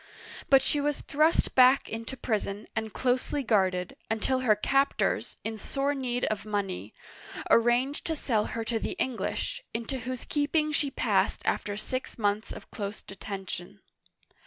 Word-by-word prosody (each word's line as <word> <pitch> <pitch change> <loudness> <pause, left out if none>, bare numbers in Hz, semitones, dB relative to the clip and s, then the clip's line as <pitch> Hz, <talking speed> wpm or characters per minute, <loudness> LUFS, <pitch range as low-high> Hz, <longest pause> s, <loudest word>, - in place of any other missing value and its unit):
But 270 -1 +7
she 295 - +1
was 295 0 0
thrust 310 +3 +2
back 255 +1 +6
into 230 +4 -5
prison 210 -3 -2
and 220 0 -2
closely 255 +4 0
guarded, 185 -6 +1
'until 225 +4 +1
her 235 -5 +4
captors, 275 +6 +1
in 220 -1 -4
sore 275 +5 -1
need 250 -3 -1
of 215 -2 -2
money, 205 -3 -3 0.6
arranged 240 +5 +3
to 325 - 0
sell 225 -7 +1
her 230 - -3
to 225 0 0
the - - -3
English, 260 - -2
into 235 +3 -2
whose 250 +1 -5
keeping 300 +1 +1
she 295 -1 +1
passed - - +1
after 205 -1 0
six 255 +4 -4
months 210 -1 0
of - - -9
close 205 0 -5
detention. 195 -1 -7
235 Hz, 150 wpm, -29 LUFS, 210-270 Hz, 0.6 s, But